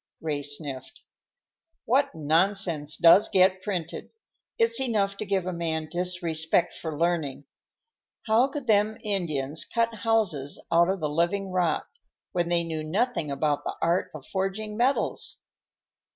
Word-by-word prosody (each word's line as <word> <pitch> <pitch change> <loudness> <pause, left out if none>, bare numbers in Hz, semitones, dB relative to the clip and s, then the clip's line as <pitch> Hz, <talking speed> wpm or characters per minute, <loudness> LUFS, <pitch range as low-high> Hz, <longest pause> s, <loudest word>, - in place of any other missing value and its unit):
Ray 150 -3 -2
sniffed. 145 -2 -4 0.8
"What 275 +4 +2
nonsense 160 0 +1
does 170 +5 +6
get 185 0 +3
printed! 185 -5 -4 0.5
It's 460 - +3
enough 205 -6 +1
to 215 - -5
give 195 -2 0
a 185 - -3
man 160 -2 -3
disrespect 175 -2 0
for 160 -3 -6
learning. 160 -5 -1 0.8
How 225 +4 +4
could 280 -1 -6
them 215 -1 +2
Indians 160 -8 0
cut 230 0 -1
houses 210 -11 0
out 170 +1 +4
of 190 -2 -1
the 155 - 0
living 175 +6 -1
rock, 180 -3 0 0.4
when 175 -1 -1
they 170 -1 +2
knew 160 -2 -4
nothing 175 - -1
about 145 +1 -1
the - - -4
art 170 +2 +1
of 145 - -9
forging 195 +3 -3
metals?" 250 +5 0
175 Hz, 135 wpm, -26 LUFS, 160-205 Hz, 0.8 s, does